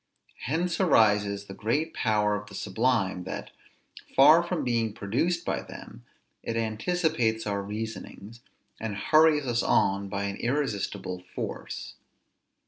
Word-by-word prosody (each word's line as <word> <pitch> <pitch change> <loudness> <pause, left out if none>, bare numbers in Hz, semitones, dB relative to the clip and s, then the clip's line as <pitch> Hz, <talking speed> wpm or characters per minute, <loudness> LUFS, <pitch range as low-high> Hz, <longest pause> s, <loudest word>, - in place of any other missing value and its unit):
Hence 165 +7 -1
arises 105 - +3
the 95 - -9
great 145 +11 -1
power 105 -2 +1
of 105 0 -4
the 100 - -10
sublime, 110 -6 0
that, - - -6 0.6
far - - +8
from - - -2
being 115 -3 0
produced 140 - -1
by - - -1
them, - - -11 0.4
it 115 - -3
anticipates 115 - 0
our 100 -1 -1
reasonings, 110 +1 -7 0.4
and 110 -2 -4
hurries 155 +5 +4
us 120 -2 +1
on 100 0 +2
by 100 0 -3
an 100 0 -3
irresistible 105 -8 -2
force. - - -5
110 Hz, 130 wpm, -27 LUFS, 100-135 Hz, 0.6 s, far